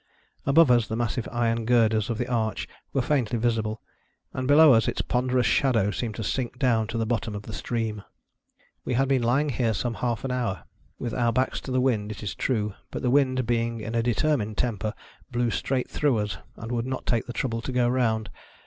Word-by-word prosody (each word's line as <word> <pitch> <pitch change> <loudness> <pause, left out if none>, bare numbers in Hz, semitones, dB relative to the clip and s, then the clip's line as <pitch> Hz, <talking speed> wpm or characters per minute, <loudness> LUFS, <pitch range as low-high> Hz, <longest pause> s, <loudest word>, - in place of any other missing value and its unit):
Above 145 0 +6
us, 120 -2 +4
the 110 - -3
massive 120 0 -2
iron 115 -1 0
girders 110 -3 +3
of 115 - -1
the 120 - -2
arch 115 -3 -1 0.2
were 135 - 0
faintly 120 -5 +1
visible, 110 -2 -1 0.5
and 130 0 -3
below 150 0 +8
us 115 -2 +3
its - - -1
ponderous 125 0 +1
shadow 115 -7 +2
seemed 110 -1 -3
to 115 - -4
sink 125 +4 -2
down 115 -4 +2
to 115 - -4
the 115 - 0
bottom 110 -2 -2
of 100 - -6
the 110 - -8
stream. 110 -2 -3 0.8
We 125 - -1
had 135 +2 +2
been 135 -2 +2
lying 130 +6 +2
here 115 -4 0
some 120 +3 -1
half 120 -2 -2
an 130 - -2
hour. 120 -7 -2 0.3
With 120 - -4
our 120 -2 +2
backs 130 +3 0
to 130 - -7
the 130 - +2
wind, 110 -5 +1
is 105 - -10
it 105 - -4
true; 105 -5 0 0.2
but - - -6
the 125 - +2
wind 130 -2 +3
being 115 0 0
in 110 +1 -5
a 115 - +2
determined 120 -2 0
temper 110 -2 -1 0.4
blew 120 -1 0
straight 130 +2 -1
through 145 -6 +2
us, 105 -5 -2 0.2
and 115 +2 -7
would 120 0 -1
not 130 0 -4
take 120 -3 0
the 120 - -5
trouble 115 -2 -2
to 130 - -4
go 125 -1 +2
round. 115 -3 0
120 Hz, 215 wpm, -26 LUFS, 110-130 Hz, 0.8 s, below